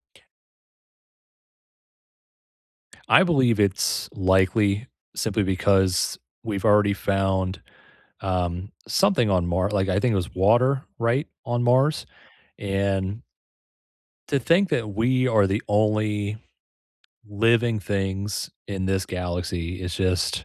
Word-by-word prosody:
T - - -24 2.8
I - - +7
believe 130 - +2
it's 100 -2 0
likely 100 +3 +2 0.3
simply 110 -1 -1
because 95 -1 +1 0.2
we've 105 -5 -4
already 105 -1 +4
found, 95 -1 -1 0.6
um, 90 0 -2 0.2
something 195 - +2
on 90 -3 +1
Mar 90 +3 0
like, 100 -2 0
I 95 +2 +1
think 120 +1 +1
it - - 0
was 95 -2 -3
water, 120 +8 +3 0.2
right, 120 +6 0 0.2
on 120 -1 -1
Mars? 130 +5 +2 0.5
And 100 +1 -2 1.1
to 140 - +1
think 175 - +2
that 115 -3 -1
we 130 +4 +1
are 110 -4 +3
the 100 +3 -1
only 105 0 0 0.9
living 115 +2 +2
things 100 0 -3 0.2
in 95 -2 -4
this 95 0 -1
galaxy 90 -1 -4
is 90 -2 -4
just 90 -1 -1
100 Hz, 110 wpm, -24 LUFS, 95-115 Hz, 2.8 s, I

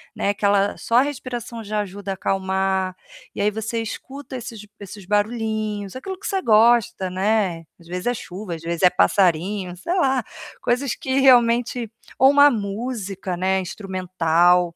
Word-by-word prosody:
né, - - -1
aquela 200 0 +1
só 230 - -2
a 250 - +7
respiração 245 -5 -5
já 210 0 -2
ajuda 200 0 -6
a - - 0
acalmar. 190 -1 -1 0.4
E - - -3
aí, 210 +1 +2
você 220 +2 -3
escuta 265 +4 -7
esses 225 -3 -8
esses 200 -1 -10
barulhinhos, 215 0 -1
aquilo 380 +7 -6
que 400 - -13
você 385 -2 -1
gosta, 220 - +3
né. 190 -3 0
Às 170 - -18
vezes 180 +3 -5
é 245 - +2
chuva, 185 -4 -6
às 160 - -10
vezes 170 +1 -4
é 180 - +8
passarinho, 180 - +1
sei 340 - -3
lá, 265 - +2 0.4
coisas 250 +1 0
que 265 0 -1
realmente 240 -2 +3 0.3
ou 265 +1 +7
uma 285 0 +7
música, 200 -3 -4
né, 190 +2 +1
instrumental 180 -2 +1
205 Hz, 160 wpm, -22 LUFS, 185-240 Hz, 0.4 s, é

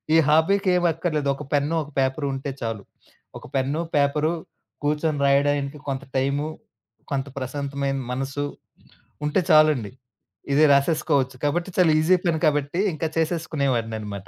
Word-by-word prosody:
ఈ - - +7
హాబీకి 185 +6 +3
ఏమక్కర్లేదు 165 -4 0
ఒక 150 - -8
పెన్ను 145 +3 +1
ఒక 145 - -13
పేపరుంటే 135 +1 -1
చాలు. 115 -3 -3 0.5
ఒక - - -12
పెన్ను, 135 +5 0
పేపరు 150 +2 +2 0.5
కూర్చొని 150 0 0
రాయడానికి 140 +1 +1
కొంత 135 0 -3
టైము, 140 +3 0 0.6
కొంత 135 0 -1
ప్రశాంతమైన 140 +1 -3
మనసు 135 +2 -2 0.8
ఉంటే 150 - +2
చాలండి. 155 -9 +4 0.6
ఇది 150 +2 +5
రాసేసుకోవచ్చు 140 -2 +1
కాబట్టి 170 +5 0
చాలా 175 -4 +5
ఈజీ 180 +4 +4
పని 160 -2 +1
కాబట్టి 145 +3 0
ఇంక 155 - -7
చేసేసుకునేవాడిననమాట. 120 - -2
145 Hz, 120 wpm, -24 LUFS, 135-155 Hz, 0.8 s, ఈ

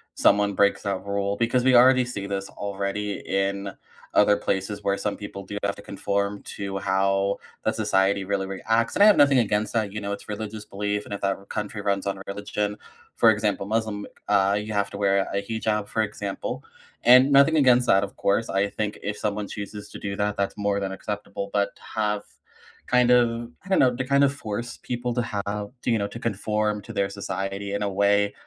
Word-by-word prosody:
someone 100 -1 +3
breaks 100 0 +3
that 100 -1 -2
rule 100 0 -1
because 120 +1 +1
we 130 -1 +5
already 130 +1 +7
see 100 -5 -5
this 100 -1 -3
already 100 0 -3
in 100 0 -1 0.4
other 105 0 +5
places 100 +1 -2
where 100 0 +1
some 105 - -2
people 100 -1 -8
do 100 +1 -6
have 100 0 +1
to - - -11
conform 100 0 -2
to 100 -1 -5
how 95 +1 +1 0.3
that - - 0
society 95 0 +2
really 95 -1 -1
reacts, 110 +4 0
and - - +1
I - - +9
have 210 - +8
nothing 140 -3 +5
against 105 -1 0
that, 105 -3 0
you 105 - -4
know, 100 0 -3
it's 100 - -6
religious 105 0 -5
belief, 105 +1 -3
and - - -7
if 100 - -5
that 100 0 0
r 100 - -16
country 105 +1 -4
runs 100 -1 0
on 100 0 -3
religion, 105 +1 -3 0.4
for 115 - +6
example, 105 -2 -1
Muslim, 110 -2 -1 0.2
uh, 100 0 +3
you 110 0 -5
have 100 0 0
to 100 - -8
wear 100 -1 +2
a 100 - 0
hijab, 105 -1 -2
for 110 - 0
example, 100 -2 -4 0.4
and 125 +3 +7
nothing 140 +3 +6
against 125 -4 +5
that, 95 +1 +5
of 100 - -6
course. 105 +3 +1
I 100 +1 +1
think 105 -1 -3
if 105 +1 -3
someone 105 -1 -2
chooses 105 0 -7
to - - -8
do 100 0 -4
that, 105 0 0
that's 100 +1 -2
more 100 -1 0
than 95 -1 -2
acceptable, 100 0 -5
but 100 -1 +1
to - - -22
have 105 -1 0 0.6
kind 125 -1 +4
of, 120 -1 +3 0.2
I - - -12
don't 190 - +3
know, 125 -2 +4
to 130 - -2
kind 140 +1 +3
of 140 - +1
force 120 -2 -5
people 120 -1 -2
to 120 - 0
have, 105 -2 -3
t - - -2
you 115 - +3
know, 100 - -1
to 115 - -7
conform 105 -1 -1
to - - -9
their 100 0 0
society 100 0 -4
in 100 - -2
a 100 - 0
way, 100 +1 +2
100 Hz, 215 wpm, -25 LUFS, 100-110 Hz, 0.6 s, I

